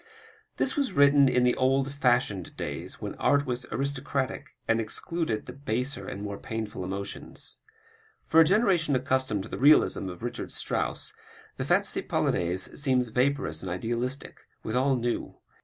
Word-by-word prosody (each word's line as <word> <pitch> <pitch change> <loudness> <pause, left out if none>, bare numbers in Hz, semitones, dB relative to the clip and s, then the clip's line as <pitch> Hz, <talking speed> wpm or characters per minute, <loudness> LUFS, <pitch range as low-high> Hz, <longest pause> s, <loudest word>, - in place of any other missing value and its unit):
This - - +2
was 280 -8 0
written 140 -2 +6
in 125 -1 +3
the 125 0 +4
old 135 +1 +2
fashioned 120 -9 +1
days, - - -5
when - - -5
art 145 0 +3
was 125 -1 -3
aristocratic 140 -1 -2
and 115 0 +3
excluded 155 +1 -2
the 125 - -8
"baser" 130 0 -3
and 100 - -5
more 100 -1 -5
painful 110 -4 -5
emotions. 100 +2 -6 0.7
For 160 - +4
a - - +10
generation 180 - +3
accustomed 130 -5 0
to 110 - -9
the - - -5
realism 140 -8 +5
of 90 +3 -9
Richard 120 0 -4
Strauss, - - -2 0.4
the - - -2
Fantaisie - - +1
Polonaise 90 +9 -1
seems 130 -4 +2
vaporous 125 - 0
and 95 - -5
idealistic, 120 +8 -3 0.2
withal 130 +4 +1
new. 120 -1 -2
125 Hz, 150 wpm, -28 LUFS, 110-140 Hz, 0.7 s, a